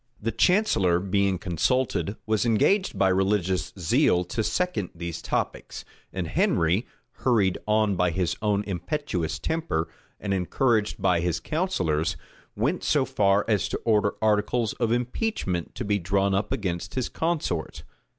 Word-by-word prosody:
The 115 +2 -2
chancellor, 115 - +3
being 100 0 +1
consulted, 100 +5 0
was 110 -1 +1
engaged 155 - +2
by 95 - +3
religious 95 -1 +1
zeal 90 +1 +3
to 110 +5 -3
second 180 - -1
these 85 -1 -5
topics; - - -3 0.3
and - - -3
Henry, 85 +8 +1 0.3
hurried 105 -8 +2
on 105 -2 +2
by 90 0 +2
his 90 +1 -1
own 105 -1 +1
impetuous 90 - -3
temper, 160 - -2 0.3
and 100 -2 -2
encouraged 105 +4 +1
by 90 -2 +3
his 85 -1 -1
counsellors, 90 - -1 0.4
went 135 - -1
so 145 -3 +2
far 100 -3 +2
as 105 -3 +1
to - - -2
order 105 -3 +2
articles 110 +2 +1
of 115 -2 +1
impeachment 120 - -2
to 120 - -4
be 100 0 +1
drawn 100 +2 +1
up 100 +2 -1
against 90 -4 -3
his 130 -2 0
consort. 160 - -2
100 Hz, 140 wpm, -26 LUFS, 90-120 Hz, 0.4 s, chancellor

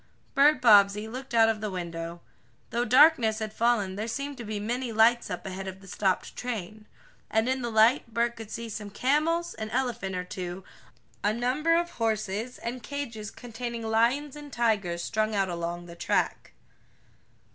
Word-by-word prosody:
Bert 285 0 +5
Bobbsey 210 -1 +6
looked 255 +2 -6
out 225 -1 +6
of 220 -2 0
the 215 - -2
window. 170 -2 -5 0.5
Though 240 +1 0
darkness 250 -3 +5
had 215 -1 -4
fallen 220 -5 +1
there 215 +3 -3
seemed 280 +4 -4
to 240 - -6
be 215 -1 -4
many 240 +3 -2
lights 225 +2 +4
up - - -5
ahead 190 0 -5
of 190 0 -7
the 195 - -15
stopped 190 -1 -1
train. 215 -3 -5 0.4
And 220 +2 +1
in 260 0 0
the 240 - -2
light 230 +3 +4
Bert 235 +1 0
could 225 -2 -9
see 230 +1 -5
some 210 -2 -6
camels, 310 +10 +1
an 220 0 -6
elephant 230 -7 -2
or 180 - -2
two, 180 0 -6 0.6
a 205 - +3
number 260 +8 +1
of 345 +1 0
horses, 220 - -2
and 240 +2 -5
cages 230 -6 -5
containing 235 -1 -6
lions 235 +6 +1
and 295 -1 -10
tigers 200 -8 0
strung 215 0 0
out 195 -2 +1
along 170 0 -4
the 170 -1 -11
track. - - -1
225 Hz, 175 wpm, -28 LUFS, 200-245 Hz, 0.6 s, Bobbsey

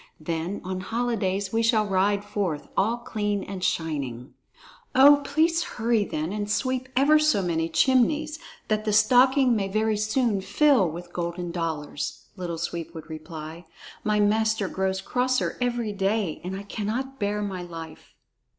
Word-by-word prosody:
Then 165 +4 -3
on 185 0 -4
holidays 200 -3 -1
we 225 - +2
shall 225 -1 +3
both 205 - -6
ride 200 +2 +2
forth, 180 -9 -3
all 220 +5 +2
clean 210 -4 -2
and 190 -2 -6
shining." 140 -8 -2 0.6
"Oh, 285 +2 +8
please 320 +4 +2
hurry 230 -6 0
then, 155 +2 -3
and 210 -1 -3
sweep 255 +3 -1
ever 290 +4 +5
so 305 -10 +2
many 165 -2 0
chimneys, 295 - +2 0.3
that 215 0 0
the 215 -1 0
stocking 250 +4 +5
may 200 -2 0
very 215 +2 0
soon 215 -1 +1
fill 205 - +3
with 175 +2 -9
golden 175 0 -3
dollars!" 160 -4 -4
Little 175 -3 -4
Sweep 170 0 -5
would 160 0 -9
reply. 160 +1 -8 0.4
"My 210 0 +1
master 220 0 +2
grows 190 0 -1
crosser 255 +3 0
every 240 -3 -1
day, 195 -3 -1
and 185 +2 -4
I 195 - -6
cannot 230 +7 -4
bear 210 0 -1
my 190 -3 -4
life." 165 -2 -10
205 Hz, 155 wpm, -25 LUFS, 175-235 Hz, 0.6 s, Oh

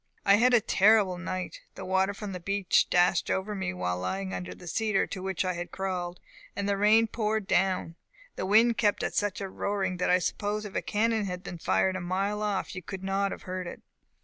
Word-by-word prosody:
"I 200 0 +6
had 245 +2 +5
a 235 - +5
terrible 195 -3 +4
night. 185 0 -5
The - - -7
water 190 +2 +1
from 205 0 -6
the 180 - -5
beach 200 +1 +1
dashed 175 0 +3
over 190 +2 -1
me 190 - -2
while 90 0 -2
lying 95 +1 -3
under 90 0 -5
the - - -13
cedar 205 +3 +1
tree - - -21
to 190 - -4
which 190 0 -2
I 185 - 0
had 175 0 -5
crawled, 180 -2 -4 0.4
and 200 0 -2
the 200 - +2
rain 215 +3 +5
poured 220 -1 -1
down. 185 -2 +1 0.4
The 185 - -3
wind 225 +3 +4
kept 205 -2 +2
such 205 -2 -1
a 195 - -3
roaring 190 -1 -2
that 180 - 0
I 180 - +5
suppose 205 +4 -2
if 205 - -8
a - - -1
cannon 220 0 0
had 180 -1 -5
been 175 - -7
fired 95 - +1
a 185 - -3
mile 195 +4 -1
off 205 -3 -2
you 185 - -6
could 190 +2 -7
not 195 +1 0
have - - -7
heard 185 -1 -4
it. - - -9
190 Hz, 225 wpm, -28 LUFS, 180-205 Hz, 0.4 s, I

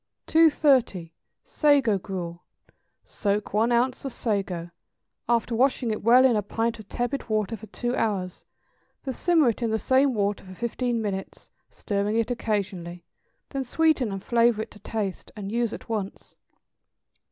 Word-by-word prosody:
230. 270 - +3 0.3
=Sago 280 -9 +3
Gruel.= 175 -3 -6 0.6
Soak 205 0 -2
one 225 +3 +2
ounce 245 +2 +1
of 270 - -4
sago, 195 -7 -2 0.6
after 235 0 +1
washing 255 -1 +2
it 215 - -3
well 245 +4 +6
in 250 -3 +4
a 210 - +2
pint 230 +3 -2
of 210 - -12
tepid 245 +1 -3
water 215 +1 0
for 220 0 -11
two 240 +3 -3
hours; 190 -5 -2 0.6
then 265 - -3
simmer 325 -3 +3
it 230 - -3
in 230 - 0
the 220 - +1
same 260 +4 +2
water 205 -1 0
for 185 -1 -11
fifteen 235 +1 -2
minutes, 195 -2 -5 0.2
stirring 205 +2 -2
it 230 +1 0
occasionally; 190 -7 -3 0.4
then 275 -2 -3
sweeten 275 -3 +2
and 195 -1 -5
flavor 235 -2 +3
it - - -13
to 210 - -14
taste, 205 -2 -4
and 200 -2 -6
use 235 -1 0
at - - -8
once. 210 -4 -5
225 Hz, 155 wpm, -26 LUFS, 200-245 Hz, 0.6 s, well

